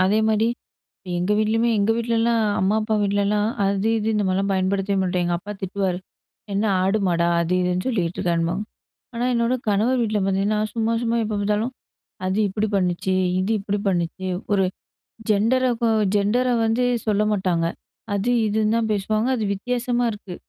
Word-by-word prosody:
அதேமாரி 220 +2 +2 0.7
எங்க 180 +4 0
வீட்லயுமே 225 +2 +2
எங்க 200 +2 +2
வீட்லலாம். 230 0 +1 0.2
அம்மா, 195 +3 +2
அப்பா 215 0 -1
வீட்லலாம். 205 +1 +1 0.2
அது 195 +2 0
இது 215 - -2
இந்த 210 -1 +1
மாதிரிலாம் 195 +2 0
பயன்படுத்தவே 195 +1 0
மாட்டாங்க. 180 -1 0
அப்பா 205 +4 -7
திட்டுவாரு 190 -1 -1 0.6
"என்ன 205 - +1 0.2
ஆடு 195 +3 +2
மாடா 170 -1 +2
அது 170 +2 0
இதுன்னு 180 +4 -1
சொல்லிகிட்டுருக்கன்பாங்க." 175 -3 -1 0.5
ஆனா, 235 +1 -1
என்னோட 235 +2 +1
கணவர் 225 +6 +2
வீட்ல 215 -2 0
பார்த்தீங்கன்னா, 195 +2 +1 0.2
சும்மா 230 0 0
சும்மா 235 0 0
எப்ப 210 -1 -2
பார்த்தாலும் 210 +5 0 0.6
"அது 190 +2 -1
இப்படி 210 +2 -1
பண்ணுச்சு. 185 0 0 0.2
இது 190 +4 0
இப்படி 205 0 -2
பண்ணுச்சு." 185 +1 -2 0.2
ஒரு 195 -2 +3 0.7
ஜெண்டரகு 235 +2 +2 0.3
ஜெண்டர 235 +6 +1 0.2
வந்து 235 +3 +1 0.2
சொல்ல 210 0 +2
மாட்டாங்க. 180 -4 0 0.5
அது 205 +5 0 0.2
இதுன்னு 215 +1 +1
தான் 225 -2 0
பேசுவாங்க. 215 +3 0
அது 220 - -2
வித்தியாசமா 245 +2 -1
இருக்கு. 200 -4 -9
205 Hz, 145 wpm, -22 LUFS, 190-225 Hz, 0.7 s, ஒரு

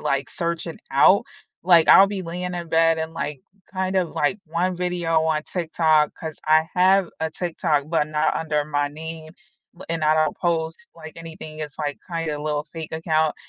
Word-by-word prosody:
like, 140 0 -1
search 170 0 -2
it 165 - -7
out. 140 +8 +5 0.4
Like 170 -3 +6
I'll 195 - +9
be 200 -2 -4
laying 180 +1 -4
in 170 -1 -5
bed 165 0 +3
and, 160 0 -3
like, 145 -4 -4 0.3
kind 190 0 -1
of, 180 -3 +1
like, 150 +8 0
one 175 +3 -1
video 175 -3 0
on 155 -1 0
TikTok, 160 -3 +1
'cause 160 -2 -7
I 155 +1 +4
have 185 0 +4
a 160 - -1
TikTok, 160 -4 -1
but 160 -3 +1
not 155 0 +1
under 150 -2 -1
my 145 -1 -1
name, 160 +1 -8 0.4
but 175 - -12
and 165 -2 -1
I 155 - +4
don't 155 -1 +1
post, 165 -2 -2
like, 160 -1 -10
anything, 160 -2 -9
it's 150 -1 -7
like, 145 -2 -3
kinda, 165 -3 -2
a 145 - -7
little 150 -1 -1
fake 160 +1 -8
account, 160 -1 +1
160 Hz, 190 wpm, -23 LUFS, 155-170 Hz, 0.4 s, I'll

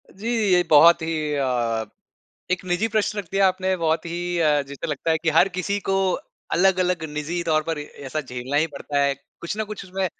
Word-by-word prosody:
जी, 200 +5 -8 0.2
ये 180 -1 +5
बहुत 165 +3 +7
ही 155 -2 -2
अ, 120 -5 0 0.7
एक 185 0 0
निजी 185 +5 0
प्रश्न 215 -1 0
रख 205 - -3
दिया 195 0 +4
आपने 185 0 -1
बहुत 165 -2 0
ही 175 +1 -3
अ, 150 -3 +3
जैसे 140 +3 -7
लगता 150 +1 -2
है 160 - +3
कि 165 - +2
हर 165 +5 +5
किसी 200 +2 -1
को 195 - +2 0.6
अलग-अलग 180 -1 +2
निजी 155 +4 -3
तौर 155 -2 +1
पर 165 -2 -1
ऐसा 145 0 -5
झेलना 130 0 -5
ही 155 +2 +3
पड़ता 145 +1 -3
है। 140 0 +2 0.3
कुछ 170 +5 -4
ना 220 - -1
कुछ 210 -1 -7
उसमें 190 +1 -3
165 Hz, 200 wpm, -23 LUFS, 150-185 Hz, 0.7 s, बहुत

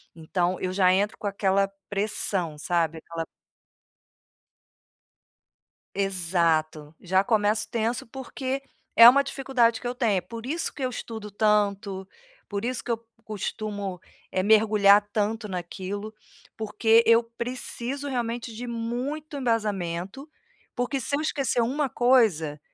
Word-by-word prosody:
então 175 +2 -1
eu 185 - -1
já 185 -1 +4
entro 205 +3 0
com - - -9
aquela 195 0 +1 0.2
pressão, 195 -5 -1
sabe, 165 0 0
aquela 165 0 -6 2.7
Exato, 165 -5 0
já 190 +2 +2
começo 215 -1 +1
tenso, 230 +1 -1
porque 265 +2 -4 0.3
é 230 +1 +11
uma 280 +3 +6
dificuldade 260 -4 +1
que - - -7
eu 245 - -2
tenho, 215 -7 +1
por 225 +5 -9
isso 325 +5 -1
que 275 - -8
eu 255 - 0
estudo 220 -3 -7
tanto, 200 -2 +1 0.4
por 200 +1 -3
isso 245 -1 -2
que - - -6
eu 230 -1 -1 0.2
costumo, 205 -3 -4 0.3
eh, 185 - 0
mergulhar 210 -1 +5
tanto 215 +1 -1
naquilo, 190 +3 -5 0.4
porque 220 +1 +3
eu 230 0 +6
preciso 245 +3 -4
realmente 235 -2 -3
de 240 +3 -6
muito 245 +6 -4
embasamento, 210 - -2 0.5
porque 245 +2 -1
se 280 +3 -1
eu - - -2
esquecer 275 -5 0
uma 275 +4 0
coisa, 215 - +2
215 Hz, 125 wpm, -26 LUFS, 190-240 Hz, 2.7 s, é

